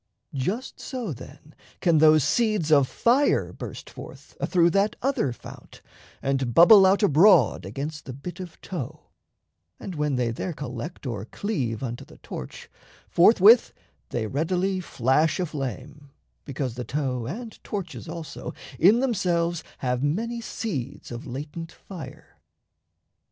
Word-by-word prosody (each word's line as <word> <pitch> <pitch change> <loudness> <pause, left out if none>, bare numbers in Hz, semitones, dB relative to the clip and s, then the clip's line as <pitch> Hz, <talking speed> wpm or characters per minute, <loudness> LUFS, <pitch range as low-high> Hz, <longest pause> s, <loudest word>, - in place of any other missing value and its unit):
Just 190 - -3
so, 245 - -4
then, 135 +4 -13 0.3
can 170 -4 +3
those 155 -1 +6
seeds 215 - +1
of 140 -3 +5
fire 255 - +2
burst - - -8
forth - - -12
Athrough 175 -2 +3
that 200 +3 +2
other 260 - +1
fount, 120 - -12 0.4
and 135 -3 -1
bubble 190 +3 +9
out 195 +3 +3
Abroad 160 - +5
against 145 +8 -5
the 130 - -6
bit 140 +9 -8
of 180 -3 -9
tow; 170 -10 -7 0.7
and 190 - -6
when 150 -3 -1
They 120 -2 0
there 170 +9 -4
collect 145 +3 -7
or 110 -5 -4
cleave 130 - -3
unto 120 -2 -4
the - - -16
torch, 65 - -8 0.4
Forthwith 215 +5 +6 0.4
they 115 -2 -2
readily 180 - 0
flash 155 +1 +1
aflame, 145 -3 -5 0.4
because 135 -3 -3
The 125 +1 -5
tow 125 -3 -2
and 225 - -7
torches, 190 -5 -6
also, 165 -3 -7 0.2
in 210 +9 +6
themselves 175 -9 0 0.2
Have 125 0 0
many 225 +12 -1
seeds 145 - -5
of 120 +5 -7
latent 150 +6 -6
fire. 170 -9 -11
155 Hz, 135 wpm, -25 LUFS, 130-190 Hz, 0.7 s, bubble